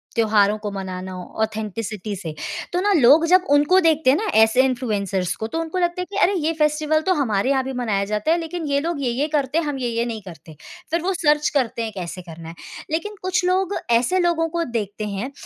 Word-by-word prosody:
त्योहारों 215 Hz, -2 st, +3 dB
को 210 Hz, -, -2 dB
मनाना, 185 Hz, -1 st, -6 dB, 0.3 s
ऑथेंटिसिटी 215 Hz, -1 st, -4 dB
से, 170 Hz, -5 st, -6 dB, 0.4 s
तो 355 Hz, -, +1 dB
ना 410 Hz, +2 st, +2 dB
लोग 300 Hz, +1 st, +6 dB
जब 365 Hz, +2 st, +4 dB
उनको 295 Hz, +6 st, +5 dB
देखते 320 Hz, -5 st, +3 dB
हैं 270 Hz, -, +5 dB
ना 440 Hz, -, -2 dB, 0.2 s
ऐसे 220 Hz, +3 st, +5 dB
इन्फ्लुएंसर्स 205 Hz, -8 st, -1 dB
को, 220 Hz, -, -4 dB
तो 325 Hz, -, -3 dB
उनको 330 Hz, +2 st, -4 dB
लगता 350 Hz, 0 st, 0 dB
है -, -, -3 dB
कि -, -, -4 dB
अरे 395 Hz, -, +4 dB
ये 315 Hz, +1 st, 0 dB
फेस्टिवल 305 Hz, +1 st, +2 dB
तो 375 Hz, -, +4 dB
हमारे 225 Hz, -5 st, 0 dB
यहाँ 270 Hz, -1 st, +2 dB
भी 265 Hz, -, -4 dB
मनाया 210 Hz, -5 st, 0 dB
जाता 210 Hz, +9 st, 0 dB
है, 335 Hz, -, +3 dB
लेकिन 330 Hz, 0 st, -5 dB
ये 280 Hz, 0 st, +1 dB
लोग 330 Hz, -2 st, -3 dB
ये-ये 255 Hz, +4 st, 0 dB
करते 285 Hz, 0 st, 0 dB
हैं, 335 Hz, -, +1 dB
हम 290 Hz, -2 st, -3 dB
ये-ये 235 Hz, -2 st, -1 dB
नहीं 225 Hz, -2 st, -5 dB
करते। 165 Hz, -3 st, -12 dB, 0.4 s
फिर 335 Hz, +1 st, +1 dB
वो 380 Hz, +3 st, 0 dB
सर्च 300 Hz, -4 st, +2 dB
करते 235 Hz, -4 st, 0 dB
हैं 225 Hz, -, -4 dB
कैसे 180 Hz, -1 st, -6 dB
करना 165 Hz, -1 st, -10 dB
है। 165 Hz, -, -10 dB, 0.4 s
लेकिन 415 Hz, +7 st, -2 dB
कुछ 365 Hz, 0 st, 0 dB
लोग 375 Hz, +1 st, +1 dB, 0.2 s
ऐसे 240 Hz, +11 st, +3 dB
लोगों 340 Hz, -2 st, +1 dB
को 340 Hz, +1 st, -1 dB
देखते 210 Hz, -1 st, -3 dB
हैं, 220 Hz, +8 st, -4 dB
265 Hz, 220 wpm, -22 LUFS, 215-330 Hz, 0.4 s, लोग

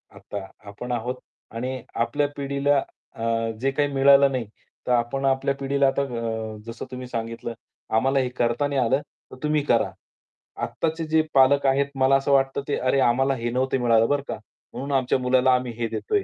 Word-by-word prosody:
आता 100 Hz, -2 st, -7 dB, 0.2 s
आपण 125 Hz, +5 st, -7 dB
आहोत 120 Hz, +2 st, -2 dB, 0.4 s
आणि 130 Hz, +1 st, -3 dB, 0.2 s
आपल्या 145 Hz, +4 st, 0 dB
पिढीला 140 Hz, +1 st, +1 dB, 0.4 s
अ, 115 Hz, -, -6 dB, 0.4 s
जे 135 Hz, +1 st, +1 dB
काही 145 Hz, +1 st, +1 dB
मिळालं 140 Hz, 0 st, +6 dB
नाही. 130 Hz, -3 st, -2 dB, 0.4 s
तर -, -, +1 dB
आपण 125 Hz, +3 st, +1 dB
आपल्या 135 Hz, +1 st, +1 dB
पिढीला 140 Hz, 0 st, +1 dB
आता 135 Hz, +1 st, +1 dB
अ, 115 Hz, -4 st, -3 dB
जसं 115 Hz, 0 st, -7 dB
तुम्ही 125 Hz, 0 st, -6 dB
सांगितलं, 115 Hz, 0 st, -4 dB, 0.4 s
आम्हाला 135 Hz, +4 st, +3 dB
हे 130 Hz, -, 0 dB
करताना 135 Hz, +4 st, +1 dB
आलं, 130 Hz, +5 st, +2 dB, 0.3 s
तर -, -, -9 dB
तुम्ही 150 Hz, -1 st, +1 dB
करा. 120 Hz, -5 st, +2 dB, 0.7 s
आत्ताचे 165 Hz, 0 st, -2 dB
जे 160 Hz, 0 st, +3 dB
पालक 140 Hz, +1 st, +5 dB
आहेत 140 Hz, +1 st, +3 dB
मला 135 Hz, 0 st, +4 dB
असं 135 Hz, +1 st, -1 dB
वाटतं, 135 Hz, 0 st, +2 dB
की 145 Hz, -, 0 dB
अरे, 130 Hz, +2 st, +1 dB
आम्हाला 135 Hz, +2 st, +3 dB
हे 120 Hz, 0 st, -3 dB
नव्हतं 130 Hz, +1 st, 0 dB
मिळालं 115 Hz, -2 st, +4 dB
बरं 145 Hz, -1 st, +1 dB
का, -, -, -3 dB, 0.4 s
म्हणून 140 Hz, +2 st, -5 dB
आमच्या 130 Hz, 0 st, +1 dB
मुलाला 130 Hz, +1 st, +3 dB
आम्ही 125 Hz, -1 st, -2 dB
हे 120 Hz, -1 st, -1 dB
देतोय. 415 Hz, -, -1 dB
130 Hz, 175 wpm, -24 LUFS, 120-140 Hz, 0.7 s, मिळालं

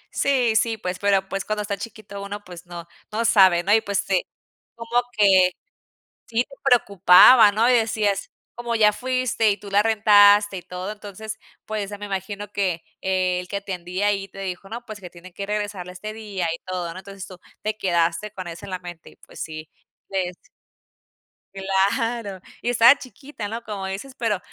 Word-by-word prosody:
Sí, 250 Hz, -5 st, +2 dB
sí, 225 Hz, 0 st, +2 dB
pues, 180 Hz, -2 st, -4 dB
pero, 195 Hz, -1 st, +2 dB
pues, 195 Hz, -1 st, -3 dB
cuando 215 Hz, +1 st, -2 dB
está 205 Hz, -1 st, -3 dB
chiquito 200 Hz, -1 st, -9 dB
uno, 205 Hz, +1 st, -6 dB
pues, 175 Hz, -1 st, -12 dB
no, 170 Hz, -1 st, -9 dB, 0.2 s
no 225 Hz, +2 st, -1 dB
sabe, 185 Hz, -6 st, +5 dB
¿no? 200 Hz, -, +3 dB
Y, 220 Hz, -, +5 dB
pues, 200 Hz, -2 st, -2 dB
sí -, -, +1 dB, 0.5 s
como 230 Hz, +1 st, 0 dB, 0.2 s
que 210 Hz, -, +5 dB, 1.0 s
sí 235 Hz, +1 st, +1 dB
te 275 Hz, +1 st, -16 dB
preocupaba, 205 Hz, -2 st, +7 dB
¿no? 225 Hz, +4 st, +2 dB
Y -, -, +5 dB
decías, 215 Hz, -4 st, 0 dB, 0.2 s
como 240 Hz, -1 st, -3 dB
ya 210 Hz, -2 st, +5 dB
fuiste 255 Hz, -2 st, 0 dB
y 200 Hz, -, -2 dB
tú 205 Hz, -, -11 dB
la 200 Hz, +1 st, +3 dB
rentaste, 205 Hz, -2 st, +5 dB
y -, -, -6 dB
todo, 180 Hz, +3 st, -6 dB
entonces, 215 Hz, +1 st, -8 dB, 0.3 s
pues, 210 Hz, -2 st, -4 dB
eh, 205 Hz, -, -6 dB
me 205 Hz, -, -6 dB
imagino 200 Hz, +1 st, -5 dB
que 185 Hz, -5 st, -1 dB, 0.2 s
el 185 Hz, -1 st, 0 dB
que 200 Hz, -, -3 dB
atendía 185 Hz, 0 st, -3 dB
ahí 195 Hz, -1 st, 0 dB
te 195 Hz, -, -13 dB
dijo: 195 Hz, 0 st, -6 dB
"No, 235 Hz, +2 st, -6 dB
pues, 215 Hz, -2 st, -8 dB
que 180 Hz, -2 st, -10 dB
tiene 175 Hz, +1 st, -14 dB
que 200 Hz, -, -5 dB
regresarla 205 Hz, -3 st, -4 dB
este 215 Hz, +4 st, -7 dB
día" 205 Hz, -6 st, -4 dB
y 165 Hz, -, -3 dB
todo, 180 Hz, -2 st, -4 dB
¿no? 185 Hz, -, -10 dB
Entonces, 195 Hz, 0 st, -9 dB
tú 185 Hz, -, -12 dB, 0.2 s
te 215 Hz, 0 st, -2 dB
quedaste 170 Hz, +1 st, 0 dB
con 185 Hz, -2 st, -7 dB
eso 170 Hz, +3 st, -8 dB
en 195 Hz, -, -9 dB
la 185 Hz, -, -3 dB
mente 175 Hz, -2 st, -11 dB
y, -, -, -21 dB
pues, -, -, -15 dB
sí, 155 Hz, -1 st, -7 dB, 0.4 s
les 185 Hz, -2 st, -2 dB, 1.2 s
Claro. 195 Hz, +2 st, -1 dB, 0.2 s
Y 240 Hz, -, 0 dB
estabas 240 Hz, +3 st, +7 dB
chiquita, 255 Hz, -4 st, -9 dB
¿no? 230 Hz, +3 st, -5 dB
Como 205 Hz, -3 st, -5 dB
dices, 200 Hz, +8 st, -6 dB
pero, 220 Hz, -5 st, 0 dB
200 Hz, 190 wpm, -23 LUFS, 185-220 Hz, 1.2 s, preocupaba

